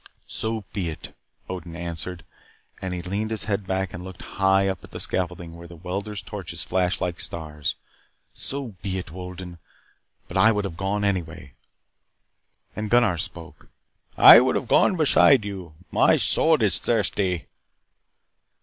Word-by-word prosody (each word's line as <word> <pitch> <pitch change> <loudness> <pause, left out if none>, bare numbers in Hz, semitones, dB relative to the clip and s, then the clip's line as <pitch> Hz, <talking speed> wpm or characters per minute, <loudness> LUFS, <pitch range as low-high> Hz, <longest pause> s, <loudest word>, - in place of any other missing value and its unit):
"So 110 -1 -2
be 90 -5 -2
it," 80 - -8 0.3
Odin 90 -2 -7
answered 85 +1 -6 0.6
and 95 - -3
he 90 -1 -4
leaned 100 +4 -2
his 110 -2 -1
head 100 -2 -2
back 95 0 -1
and 90 - -7
looked 95 -1 -10 0.2
high 95 0 +4
up 95 - -3
at - - -12
the - - -8
scaffolding 85 -2 -3
where 85 0 -11
the 85 - -12
welders' 100 +4 -5
torches - - -6
flashed 90 0 0
like 90 0 -2
stars. 75 -5 -3 0.6
"So 135 -2 -2
be 95 -2 -3
it, 90 -4 -6
Wolden. 90 0 -8 0.7
But - - -4
I 115 - +6
would 105 -1 -1
have 90 -4 -5
gone 95 +4 -1
anyway." 85 -7 -2 1.2
And 105 0 -3
Gunnar 115 -7 +3
spoke: - - -7 0.5
"I - - +11
would - - +2
have - - -2
gone - - +4
beside 140 -6 +5
you. 95 -6 -7 0.2
My - - +5
sword 160 -7 +3
is 100 -5 +3
thirsty." 100 -6 0
95 Hz, 155 wpm, -24 LUFS, 85-105 Hz, 1.2 s, I